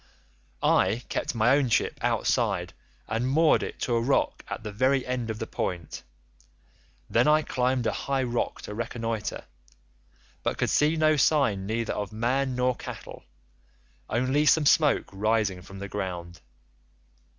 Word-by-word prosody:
I 110 +6 +3
kept - - -2
my 120 +4 +4
own 140 -3 +1
ship - - +1
outside, - - 0 0.3
and 115 +3 -1
moored 155 +3 +4
it - - -6
to 120 - 0
a 115 - +2
rock 135 +4 0
at - - -6
the 105 - -5
very 130 +5 +1
end 125 -2 -3
of 110 - -3
the 110 - -4
point; 90 -6 -4 1.1
then 120 +4 +2
I 155 +1 +4
climbed 125 -2 0
a 110 - +2
high 135 -1 -1
rock 120 -1 -2
to 105 - -6
reconnoitre, 115 -1 -3 1.0
but - - -2
could - - 0
see 150 +2 +3
no 155 -1 +3
sign 125 -11 +2
neither 115 +1 -1
of 105 -1 -4
man 125 +4 0
nor 125 0 +1
cattle, - - -9 0.8
only 130 +6 +1
some 155 -1 +5
smoke 150 0 +4
rising 105 -2 0
from 100 +3 -11
the 100 +1 -6
ground. 90 -4 -5
120 Hz, 150 wpm, -27 LUFS, 105-135 Hz, 1.1 s, some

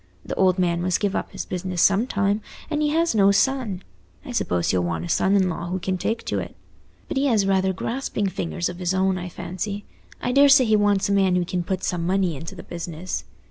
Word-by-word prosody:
The - - -4
old 185 -1 +3
man 175 -2 +1
must 180 0 +1
give 205 -2 0
up - - -3
his - - -5
business 180 -1 -4
sometime, 200 +1 +2 0.3
and 300 0 0
he 300 - +2
has 330 +2 +2
no 200 -2 +5
son; 205 -3 +1 0.4
I - - -6
suppose 90 -1 0
he'll 90 -1 +1
want 85 -1 -2
a - - -7
son 195 - +2
in 190 -2 +3
law 175 -1 -3
who 180 +2 -2
can 185 0 -2
take 225 +5 -2
to 100 - -1
it. 85 -2 -7 0.5
But - - -3
he 280 +1 +2
has 220 -6 +3
rather 190 -1 +2
grasping 225 +2 -2
fingers 175 -2 -2
of 175 0 -7
his 180 +1 0
own, 190 0 +1
I 180 0 -5
fancy. 200 +4 -5 0.3
I 245 - -1
daresay 275 0 +6
he 220 -1 +3
wants 205 -2 +2
a - - -1
man 195 -2 +3
who 180 -1 +1
can 180 +1 -2
put 185 +1 -3
some 175 -3 -1
money 185 -1 +1
into 160 +4 -8
the - - -9
business. 170 - -5
190 Hz, 230 wpm, -23 LUFS, 175-205 Hz, 0.5 s, daresay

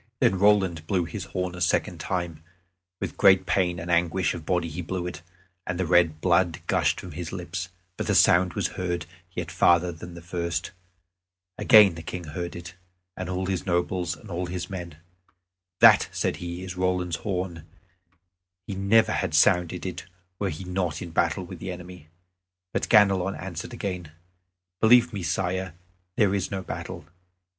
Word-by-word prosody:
Then 95 - +3
Roland 95 -6 +3
blew 90 -4 +1
his - - -6
horn 90 -1 -3
a 90 - -8
second 85 - +1
time; 85 -4 -3 0.6
with - - -5
great 95 -1 +6
pain 90 -1 +1
and 85 +1 -4
anguish 85 +2 +2
of 80 -3 -8
body 90 -2 +1
he 80 +3 -5
blew 90 +1 -4
it, 90 -1 -6 0.5
and 90 0 -3
the 95 - +1
red 85 -2 +3
blood 90 -2 +2
gushed - - +1
from 90 - -8
his 85 +3 -6
lips; 90 -1 -5 0.3
but - - -3
the - - +2
sound 90 0 +5
was - - 0
heard 90 -2 -3 0.3
yet - - -4
farther 85 +1 +4
than 85 +1 -10
at 85 - -11
first. 85 -1 -3 0.9
Again 105 -6 +7
the 80 - -8
King 90 +2 -6
heard 85 +3 -5
it, 85 0 -8 0.4
and 90 -1 -5
all 95 +1 -2
his 95 0 -2
nobles, 90 0 0
and 105 - -12
all 90 +1 -2
his 90 +1 -5
men. 85 -5 -6 0.8
"That," - - +7
said - - -1
he, 85 +1 -6
"is 95 0 -6
Roland's 90 -2 0
horn; 90 -5 -4 1.0
he 100 - -5
never 100 +4 +3
had - - -1
sounded 90 +1 +3
it 90 -1 -5 0.3
were 100 - 0
he 85 +3 -6
not 90 -1 -2
in 85 - -8
battle 85 +2 +1
with 85 - -9
the 95 - -5
enemy." 90 -2 -10 0.7
But - - -1
Ganelon 100 -3 +4
answered 85 0 -6
again: 90 -8 -5 0.7
"Believe 120 +1 +5
me, 100 - -3
Sire, 90 +1 -2 0.4
there 100 -3 +3
is 100 - -1
no 95 -1 -4
battle. 80 - -6
90 Hz, 170 wpm, -26 LUFS, 85-95 Hz, 1.0 s, Again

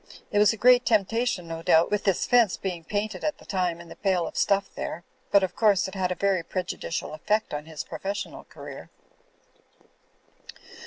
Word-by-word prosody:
It 205 - +2
was 210 - +6
a 225 - -5
great 245 +3 +6
temptation, 225 -3 +1
no 165 0 -5
doubt, 165 +2 +4
with 210 -1 0
this 195 -3 +2
fence 235 -6 +4
being 180 -4 -4
painted 205 +1 -3
at 300 -3 -1
the - - -17
time 180 -3 -1
and 170 -1 -12
the - - -9
pail 185 -4 +1
of - - -7
stuff 200 -1 +2
there; 170 - -5 0.3
but, 200 -1 +5
of 190 - -2
course, 205 -4 +3
it 190 - -9
had 185 -2 -1
a - - -1
very 195 0 +1
prejudicial 175 -2 -4
effect 210 +7 -1
on 150 +1 -4
his 155 -3 -6
professional 195 +5 -5
career." - - -10
195 Hz, 190 wpm, -26 LUFS, 170-210 Hz, 0.3 s, was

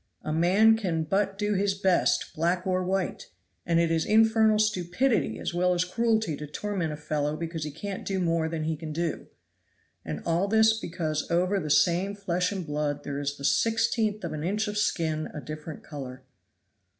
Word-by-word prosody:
A 155 - -2
man 195 +7 +5
can 175 -7 -1
but 195 +4 0
do 210 +1 0
his 195 0 +1
best, 190 -2 +1
black 175 +3 0
or 185 -1 +1
white, 190 0 -2 0.4
and 170 0 +3
it 170 -1 +2
is 165 -1 +2
infernal 220 0 +4
stupidity 195 - +1
as - - -4
well 180 +1 +2
as 175 +1 +1
cruelty 220 -3 0
to 150 - -7
torment 180 0 -3
a 150 - -5
fellow 150 0 -2
because 165 -1 -4
he - - -3
can't 190 +6 -6
do 195 -1 -2
more 165 -2 +1
than 160 -1 -3
he 160 +1 -1
can 155 0 -7
do. 165 0 -3 0.8
And 75 -1 -5
all 170 +4 +1
this 220 +1 +5
because 160 -5 -3
over 180 +3 +2
the 155 - -4
same 175 +6 +3
flesh 180 -2 -1
and 190 -4 -4
blood 145 -1 -2
there 140 0 -4
is 145 0 -3
the 140 - -6
sixteenth 225 +1 +1
of 170 - -3
an 150 -1 -4
inch 210 +5 0
of 210 - -4
skin 160 -7 0
a - - -4
different 155 +1 -8
color. 130 -3 -8
175 Hz, 190 wpm, -27 LUFS, 155-200 Hz, 0.8 s, man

